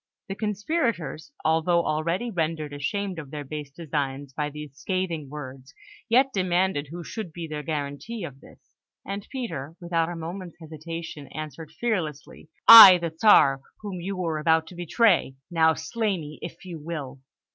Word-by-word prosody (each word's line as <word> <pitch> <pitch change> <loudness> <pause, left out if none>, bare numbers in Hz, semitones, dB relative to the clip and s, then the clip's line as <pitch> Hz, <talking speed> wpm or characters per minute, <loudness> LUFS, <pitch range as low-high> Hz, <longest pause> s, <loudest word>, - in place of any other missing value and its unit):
The - - -2
conspirators, 210 - -2
although 165 +2 +2
already 170 +10 -1
rendered 160 -4 -2
ashamed 190 +5 -3
of 145 -4 -9
their 150 +1 -6
base 150 0 -6
designs 140 -3 -4
by 150 +1 -2
these 150 -2 -9
scathing 170 -4 -3
words, 135 -1 -9 0.3
yet 260 +3 +4
demanded 185 -5 0
who 170 +2 -7
should 215 -1 -6
be 165 +1 -6
their 150 -1 -5
guarantee 150 +8 -4
of 135 -5 -8
this; - - -19 0.3
and 200 0 -5
Peter, 165 - -5
without 170 -1 0
a 175 - -5
moment's 170 +2 -7
hesitation, 160 -2 -8
answered 155 +2 -8
fearlessly: 160 -10 -4 0.2
"I, 210 -5 +13
the 170 -2 -5
Czar, 140 -8 +5 0.2
whom 195 -4 -6
you 195 +2 -4
were 165 -4 -2
about 160 +1 +3
to 180 - -12
betray! 175 - +2 0.2
Now, 160 -1 +4
slay 200 +5 -2
me 150 -2 -9
if 170 +2 -9
you 170 -3 -7
will!" 145 -4 -6
165 Hz, 155 wpm, -25 LUFS, 150-185 Hz, 0.3 s, I